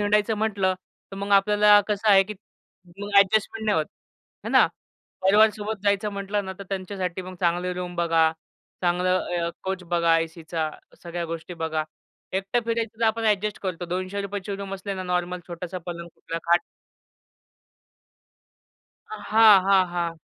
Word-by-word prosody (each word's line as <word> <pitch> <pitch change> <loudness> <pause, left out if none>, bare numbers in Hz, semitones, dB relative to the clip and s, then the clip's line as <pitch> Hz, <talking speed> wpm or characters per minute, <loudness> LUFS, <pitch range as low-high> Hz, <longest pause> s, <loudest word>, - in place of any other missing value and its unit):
हिंडायचं 210 +1 +2
म्हटलं, 200 -3 0 0.4
तर 195 - -8
मग 200 +1 -5
आपल्याला 205 +1 +6
कसं 210 +1 0
आहे 195 -2 +7
की 210 +2 -7 0.6
मग 205 0 -2
एडजस्टमेंट 215 +2 +2
नाही 210 -1 +2
होत, 155 - -1 0.6
आहे - - -3
ना. - - +6 0.6
परिवार 210 +3 +6
सोबत 210 -1 -5
जायचं 200 0 +1
म्हटलं 200 +1 -2
ना, 190 - -5
तर - - -6
त्यांच्यासाठी 185 -2 -4
मग 185 0 -9
चांगली 175 +1 +1
रूम 180 0 -5
बघा, 165 -2 +3 0.5
चांगलं 180 +1 +2 0.3
अ, - - -2
कोच 190 -1 -3
बघा, 170 -1 +2
एसीच्या 165 -1 -3 0.3
सगळ्या 170 0 -4
गोष्टी 165 +2 -6
बघा. 160 -2 -2 0.5
एकटं 195 +5 0
फिरायचं, 230 -1 -2
तर - - +3
आपण 225 +1 0
एडजस्ट 210 -1 +1
करतो. 180 -2 -3
₹200ची 200 +3 -4
रूम 195 0 -5
असली 195 +1 -5
ना, 185 - -4
नॉर्मल 180 0 -2
छोटासा 175 +1 -6
पलंग, 170 -1 -6
कुठला 165 - -6
खाट 170 +1 +4 2.5
हां, 220 - +5
हां. 195 -1 +5
हां. 170 -1 -2
190 Hz, 150 wpm, -25 LUFS, 175-205 Hz, 2.5 s, आहे